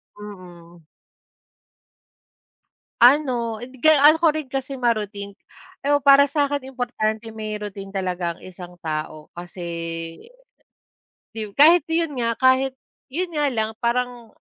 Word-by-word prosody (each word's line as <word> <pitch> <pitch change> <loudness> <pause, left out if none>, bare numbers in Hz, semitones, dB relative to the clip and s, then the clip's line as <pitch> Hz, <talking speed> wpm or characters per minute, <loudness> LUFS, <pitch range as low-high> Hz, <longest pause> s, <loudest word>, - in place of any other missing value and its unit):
Mm. 175 -5 -13 2.2
Ano 240 -4 +3
ibigay 260 +5 +2
ano 300 +2 +6
ko 320 -2 +3
rin 305 -4 -5
kasi 270 0 -4
ma-routine, 210 -5 -2 0.5
ewan 290 0 +3
para 280 +1 +7
sa'kin 285 -1 -1
importante 225 -3 -2
may 215 -1 -6
routine 195 -1 -8
talaga 180 -3 -2
ang - - -21
isang 180 -1 -11
tao 155 -1 -5
kasi 175 +1 -9 1.7
yu 215 -3 -7
kahit 315 +2 +6
yun 325 -1 0
nga, 230 -1 0
kahit, 260 +1 +2 0.3
yun 345 +6 -3
nga 295 -2 0
lang 220 -1 -1
parang 240 -1 -2
235 Hz, 115 wpm, -22 LUFS, 200-280 Hz, 2.2 s, para